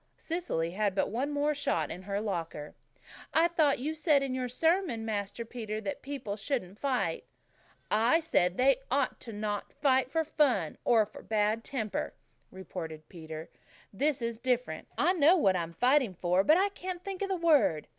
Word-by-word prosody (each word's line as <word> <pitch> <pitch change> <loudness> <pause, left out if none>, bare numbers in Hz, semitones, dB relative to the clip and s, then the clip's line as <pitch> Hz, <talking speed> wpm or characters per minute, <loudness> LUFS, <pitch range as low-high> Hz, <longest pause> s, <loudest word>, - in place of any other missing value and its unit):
Cecily 325 - -2
had 200 +1 0
but 195 - 0
one 255 +6 -1
more 295 +1 +1
shot 170 - -1
in 180 - -6
her 200 +1 -3
locker. 165 -7 -4 0.6
"I 330 +1 +6
thought 315 -5 +2
you 295 +5 -2
said 300 -3 +3
in 270 -2 -2
your 255 -1 -2
sermon, 320 -4 +1
Master 210 +1 -3
Peter, 220 -2 -5
that 200 -3 -5
people 265 -7 -5
shouldn't 205 -4 -3
fight." 270 -3 -1 0.7
"I 230 +9 +4
said 185 - +1
they 265 0 +4
oughtn't 270 +1 0 0.2
to 205 -1 -1 0.2
fight 265 -3 +3
for 320 +4 +1
fun, 270 - +1
or 225 -3 +4
for 215 - -12
bad 215 +1 0
temper," 225 -7 -3 0.3
retorted 165 -4 -8
Peter. 160 -2 -8 0.4
"This 270 +3 0
is 230 -1 -3
different. 245 -10 -1
I 350 +5 +3
know 340 +1 +5
what 195 - +3
I'm 170 -2 -2
fighting 250 - +3
for 180 +2 +2
but 310 +9 +5
I 395 +2 +3
can't 365 -2 -6
think 390 -1 -5
of 395 - -1
the 380 - +1
word." 300 - +3
245 Hz, 175 wpm, -30 LUFS, 195-295 Hz, 0.7 s, I